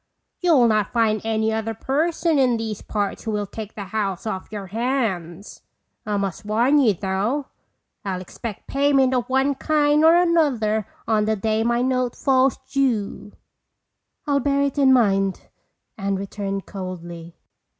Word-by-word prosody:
You'll 310 Hz, -10 st, +4 dB
not 215 Hz, -2 st, +1 dB
find 220 Hz, -3 st, +1 dB
any 220 Hz, 0 st, 0 dB
other 220 Hz, 0 st, -2 dB
person 315 Hz, -, 0 dB
in 250 Hz, -3 st, +3 dB
these 220 Hz, -2 st, -4 dB
parts 205 Hz, -2 st, -3 dB
who 225 Hz, -, -4 dB
will 210 Hz, -1 st, -1 dB
take 215 Hz, +1 st, -8 dB
the 205 Hz, -, -5 dB
house 195 Hz, -2 st, -3 dB
off 200 Hz, -3 st, -5 dB
your 205 Hz, -2 st, -5 dB
hands. 205 Hz, -5 st, -3 dB, 0.5 s
I 210 Hz, -1 st, 0 dB
must 195 Hz, -2 st, -3 dB
warn 235 Hz, +8 st, +3 dB
you 225 Hz, -8 st, +3 dB
though, 205 Hz, -, -2 dB, 0.5 s
I'll 190 Hz, -2 st, -3 dB
expect 205 Hz, +3 st, -8 dB
payment 275 Hz, -2 st, +2 dB
of 245 Hz, -1 st, -1 dB
one 265 Hz, +2 st, +2 dB
kind 295 Hz, +1 st, +2 dB
or 325 Hz, +1 st, +7 dB
another 280 Hz, -, +2 dB, 0.2 s
on 215 Hz, -2 st, +2 dB
the 220 Hz, 0 st, +1 dB
day 220 Hz, +2 st, 0 dB
my 235 Hz, +1 st, +1 dB
note 255 Hz, -1 st, 0 dB
falls 265 Hz, -1 st, +2 dB
due." 230 Hz, -6 st, -1 dB, 0.9 s
"I'll 285 Hz, -2 st, +2 dB
bear 280 Hz, +1 st, +1 dB
it 280 Hz, +1 st, -1 dB
in 270 Hz, -1 st, +5 dB
mind," 195 Hz, -6 st, +2 dB, 0.6 s
Anne 195 Hz, 0 st, -1 dB
returned 195 Hz, 0 st, -4 dB
coldly. 175 Hz, -3 st, -8 dB
220 Hz, 150 wpm, -22 LUFS, 200-270 Hz, 0.9 s, or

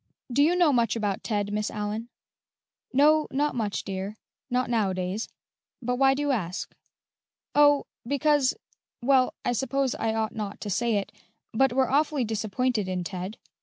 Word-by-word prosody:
"Do 280 Hz, -, +4 dB
you 325 Hz, +5 st, +4 dB
know 345 Hz, -5 st, +4 dB
much 235 Hz, -3 st, +2 dB
about 205 Hz, -4 st, -2 dB
Ted, 205 Hz, -2 st, -1 dB
Miss 210 Hz, 0 st, -1 dB
Allyn?" 215 Hz, +2 st, -4 dB, 0.8 s
"No, 300 Hz, +3 st, +4 dB
not 290 Hz, +2 st, 0 dB
much, 215 Hz, -4 st, -2 dB
dear 195 Hz, +2 st, -5 dB, 0.3 s
not 250 Hz, 0 st, +1 dB
nowadays; 195 Hz, -3 st, -1 dB, 0.5 s
but 250 Hz, 0 st, -2 dB
why 270 Hz, 0 st, +4 dB
do 290 Hz, -, -2 dB
you 290 Hz, -, +1 dB
ask?" 185 Hz, -8 st, -3 dB, 0.8 s
"Oh, 290 Hz, -1 st, +5 dB, 0.2 s
because 285 Hz, 0 st, +2 dB, 0.5 s
well, 260 Hz, 0 st, +3 dB
I -, -, +2 dB
suppose 265 Hz, +2 st, 0 dB
I 225 Hz, 0 st, -1 dB
ought 220 Hz, -1 st, -1 dB
not 210 Hz, -3 st, -5 dB
to 205 Hz, -, -4 dB
say 235 Hz, +3 st, +1 dB
it, 200 Hz, 0 st, -2 dB, 0.4 s
but 270 Hz, +3 st, +3 dB
we're 260 Hz, 0 st, +2 dB
awfully 290 Hz, -1 st, +2 dB
disappointed 220 Hz, 0 st, -1 dB
in 185 Hz, -1 st, -2 dB
Ted. 185 Hz, +3 st, -5 dB
235 Hz, 160 wpm, -27 LUFS, 210-270 Hz, 0.8 s, Oh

